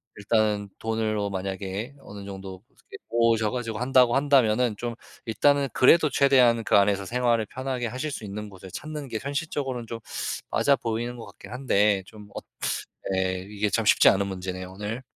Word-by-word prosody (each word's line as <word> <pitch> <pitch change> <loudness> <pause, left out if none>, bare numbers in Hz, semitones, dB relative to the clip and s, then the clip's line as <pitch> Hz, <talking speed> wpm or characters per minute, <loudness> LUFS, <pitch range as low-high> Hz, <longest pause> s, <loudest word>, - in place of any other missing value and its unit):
일단은 105 -1 0
돈을 110 -1 -1
어 100 0 -1
만약에 95 +5 -4
어느 100 -5 -10
정도 95 -1 -8
이렇게 - - -14
모으셔 115 -2 +2
가지고 115 -2 -3
한다고 125 -1 +4
한다면은 125 -5 +3
좀 120 0 -4 0.3
일단은 140 +5 +2
그래도 155 +4 +5
최대한 125 -4 +4
그 - - +2
안에서 100 0 +3
생활을 120 0 +1
편하게 130 -2 -3
하실 130 +6 -4
수 115 - -6
있는 105 +1 -6
곳을 95 -1 -12
찾는 150 -3 -6
게 110 - -3
현실적으로는 140 -4 -3
좀 115 0 -6 0.5
맞아 140 - +3
보이는 120 +1 -3
것 115 - -8
같긴 100 +1 -13
한데, 105 -6 +2
좀 105 -1 -13
엇 - - -7 0.7
예, 95 0 -1
이게 105 0 -1
참 110 +2 0
쉽지 - - +6
않은 100 0 +2
문제네요, 95 -1 -5
오늘. 105 +5 -5
115 Hz, 365 characters per minute, -26 LUFS, 100-125 Hz, 0.7 s, 쉽지